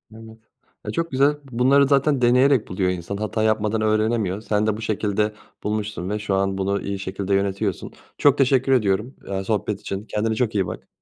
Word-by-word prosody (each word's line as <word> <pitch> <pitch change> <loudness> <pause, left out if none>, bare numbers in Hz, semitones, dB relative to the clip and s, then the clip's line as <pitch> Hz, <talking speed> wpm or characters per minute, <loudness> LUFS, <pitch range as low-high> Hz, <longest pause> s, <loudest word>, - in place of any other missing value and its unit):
Evet. 110 0 -12 0.5
E, - - -3
çok 165 -1 -2
güzel. 140 +3 +3 0.2
Bunları 135 +3 +4
zaten 140 -1 +2
deneyerek 125 0 +4
buluyor 90 0 -1
insan, 90 +2 -5
hata 110 +1 -2
yapmadan 110 0 +1
öğrenemiyor. 110 -2 +1
Sen 105 0 0
de 105 - 0
bu 110 - -8
şekilde 105 0 -1 0.3
bulmuşsun 105 -4 -3
ve 105 0 -2
şu 105 -2 -1
an 95 0 0
bunu 100 +1 -1
iyi 100 -1 -4
şekilde 95 +1 -3
yönetiyorsun. 100 0 -1 0.3
Çok 145 -1 +4
teşekkür 135 0 +3
ediyorum, 110 0 +1
aaa, 95 0 -2
sohbet 105 -1 -1
için. 100 +2 -5
Kendine 110 +1 -1
çok 110 -2 -1
iyi 95 -3 +1
bak. - - -8
110 Hz, 185 wpm, -22 LUFS, 100-120 Hz, 0.5 s, Bunları